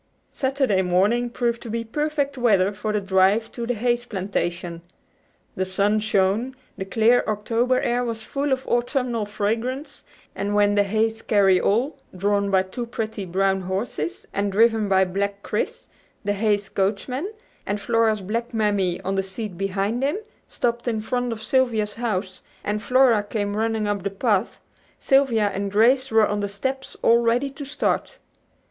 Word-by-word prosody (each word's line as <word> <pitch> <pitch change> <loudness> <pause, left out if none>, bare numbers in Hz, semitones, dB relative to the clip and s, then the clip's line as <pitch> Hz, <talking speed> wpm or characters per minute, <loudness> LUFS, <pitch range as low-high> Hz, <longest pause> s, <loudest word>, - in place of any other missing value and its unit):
Saturday 265 -8 +1
morning 200 +7 +2
proved 235 -1 -1
to 235 - -8
be 230 +1 -2
perfect 285 +3 -1
weather 205 -6 +3
for 210 +2 -3
the 210 - +1
drive 195 +3 +2
to 235 -1 -5
the 245 - 0
Hayes 240 +2 0
plantation. 180 -5 -3 0.7
The 190 - 0
sun 200 +3 +1
shone, 215 +4 +1 0.2
the 190 - -5
clear 225 +5 +3
October 230 +4 +1
air 245 +1 0
was 230 -2 -4
full 280 +3 -2
of 265 0 0
autumnal 240 -2 0
fragrance, 225 +7 -3 0.3
and 205 +1 -2
when 205 0 +4
the 205 - +4
Hayes 220 +2 0
carry 195 -3 +3
all, 255 +8 +1 0.2
drawn 200 +1 +1
by 190 -1 +3
two 235 +6 -6
pretty 220 -3 -4
brown 190 +2 +1
horses, 185 -4 -3
and 200 0 0
driven 220 0 +3
by 190 0 +4
black 200 +2 -3
Chris, - - -3 0.4
the 205 0 0
Hayes 205 -1 +1
coachman, 250 - -2 0.4
and 205 +1 -1
Flora's 220 0 +1
black 230 +5 -3
mammy 200 -5 +1
on 190 - -2
the 195 - +1
seat 195 +1 -6
beside 195 +5 -1
him, 285 +7 +1 0.3
stopped 235 0 -2
in 225 -2 0
front 245 +2 -2
of 220 -1 -5
Sylvia's 225 -6 +1
house 190 -5 -3 0.2
and 210 +1 -2
Flora 250 -1 +4
came 205 -1 -3
running 220 -1 0
up 205 -1 -1
the 200 - -2
path, 205 +1 0 0.4
Sylvia 240 -7 +3
and 200 0 -3
Grace 255 +6 +4
were 220 -2 +5
on 205 0 -1
the 205 0 -2
steps 265 +7 -4
all 235 +1 +6
ready 240 +4 +1
to 275 +1 -8
start. 280 - -1
215 Hz, 165 wpm, -23 LUFS, 200-240 Hz, 0.7 s, all